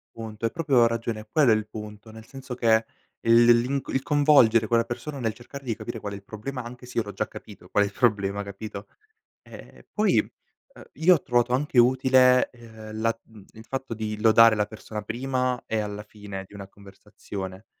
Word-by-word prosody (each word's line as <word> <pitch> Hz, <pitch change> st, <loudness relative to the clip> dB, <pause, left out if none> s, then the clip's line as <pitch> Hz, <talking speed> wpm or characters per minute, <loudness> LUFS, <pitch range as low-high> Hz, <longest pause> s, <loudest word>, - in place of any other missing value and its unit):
Punto, 110 Hz, -1 st, -8 dB
hai 115 Hz, -, +2 dB
proprio 140 Hz, -7 st, +3 dB
ragione 115 Hz, -1 st, -2 dB
e 110 Hz, -, -13 dB
quello 135 Hz, -2 st, +4 dB
è -, -, +6 dB
il 110 Hz, -1 st, -2 dB
punto. 105 Hz, 0 st, -10 dB
Nel 110 Hz, 0 st, -12 dB
senso 135 Hz, -2 st, -8 dB
che 115 Hz, -2 st, +3 dB, 0.4 s
il 115 Hz, +1 st, +5 dB
l'inc 125 Hz, +3 st, +2 dB
il 135 Hz, -, -1 dB
coinvolgere 140 Hz, -7 st, +4 dB
quella 115 Hz, +1 st, +2 dB
persona 140 Hz, +5 st, -6 dB
nel 115 Hz, -2 st, -1 dB
cercare 135 Hz, +4 st, -11 dB
di 115 Hz, -, -2 dB
capire 115 Hz, +1 st, -7 dB
qual 100 Hz, -, -5 dB
è -, -, -5 dB
il 100 Hz, -, -13 dB
problema 125 Hz, +6 st, -6 dB
anche 125 Hz, +1 st, -10 dB
se 125 Hz, -, -5 dB
io 115 Hz, -, +1 dB
l'ho 105 Hz, -, -7 dB
già 95 Hz, -, -3 dB
capito -, -, -12 dB
qual 105 Hz, -, +3 dB
è -, -, -1 dB
il 100 Hz, -, -8 dB
problema, 100 Hz, -4 st, +1 dB
capito, 100 Hz, 0 st, -8 dB, 0.5 s
ehm, -, -, -14 dB
poi, -, -, +2 dB
uh, -, -, -10 dB
io 180 Hz, +3 st, +5 dB
ho 145 Hz, -, -3 dB
trovato 120 Hz, 0 st, +1 dB
anche 135 Hz, -1 st, +1 dB
utile, 130 Hz, 0 st, +4 dB
ehm, 110 Hz, -2 st, -10 dB
la 115 Hz, 0 st, +1 dB
mhmm, 105 Hz, -3 st, -17 dB
il 110 Hz, 0 st, -13 dB
fatto 135 Hz, -2 st, -5 dB
di 105 Hz, -1 st, -4 dB
lodare 115 Hz, 0 st, +6 dB
la 105 Hz, -1 st, +1 dB
persona 110 Hz, -1 st, -8 dB
prima 125 Hz, +2 st, -2 dB
e 110 Hz, -, -1 dB
alla 105 Hz, 0 st, -5 dB
fine 105 Hz, -2 st, -9 dB
di -, -, -20 dB
una 100 Hz, -1 st, -9 dB
conversazione, 100 Hz, 0 st, -10 dB
115 Hz, 205 wpm, -25 LUFS, 105-125 Hz, 0.5 s, è